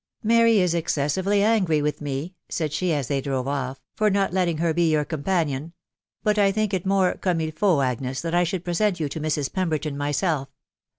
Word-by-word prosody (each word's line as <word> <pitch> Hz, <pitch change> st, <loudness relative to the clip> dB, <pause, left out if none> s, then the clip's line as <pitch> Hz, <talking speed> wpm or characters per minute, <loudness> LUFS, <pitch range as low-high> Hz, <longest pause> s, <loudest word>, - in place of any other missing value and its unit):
" -, -, -44 dB
Mary 230 Hz, -1 st, +5 dB
is 180 Hz, -3 st, +2 dB
excessively 170 Hz, +5 st, +1 dB
angry 200 Hz, -8 st, +3 dB
with 150 Hz, 0 st, -1 dB
10%" 145 Hz, +4 st, -4 dB, 0.2 s
said 155 Hz, -3 st, -2 dB
ahe, 185 Hz, -, +1 dB
as 145 Hz, -5 st, -1 dB
they 140 Hz, -2 st, 0 dB
drove 130 Hz, -2 st, -2 dB
of£ 135 Hz, -1 st, -2 dB
" -, -, -61 dB
far 215 Hz, -1 st, +3 dB
not 195 Hz, -2 st, +1 dB
letting 180 Hz, -4 st, +1 dB
her 165 Hz, 0 st, +1 dB
he 170 Hz, -2 st, +3 dB
your 150 Hz, -1 st, +2 dB
companion; 160 Hz, -1 st, -2 dB, 0.5 s
but 210 Hz, 0 st, +2 dB
I 200 Hz, -1 st, +4 dB
think 215 Hz, 0 st, -1 dB
it 190 Hz, 0 st, -1 dB
more 195 Hz, -2 st, +3 dB
cotnme 165 Hz, -4 st, -1 dB
Ufaut, 155 Hz, -5 st, +2 dB
.Agnes, 130 Hz, +1 st, -3 dB
that 165 Hz, 0 st, -3 dB
1 175 Hz, 0 st, +3 dB
should 180 Hz, +1 st, -3 dB
present 180 Hz, +2 st, 0 dB
you 155 Hz, -, 0 dB
to 150 Hz, -, -6 dB
Mrs. 150 Hz, -3 st, -1 dB
Pemberton 155 Hz, -6 st, -1 dB
myself. 145 Hz, 0 st, -1 dB
165 Hz, 210 wpm, -24 LUFS, 145-190 Hz, 0.5 s, Mary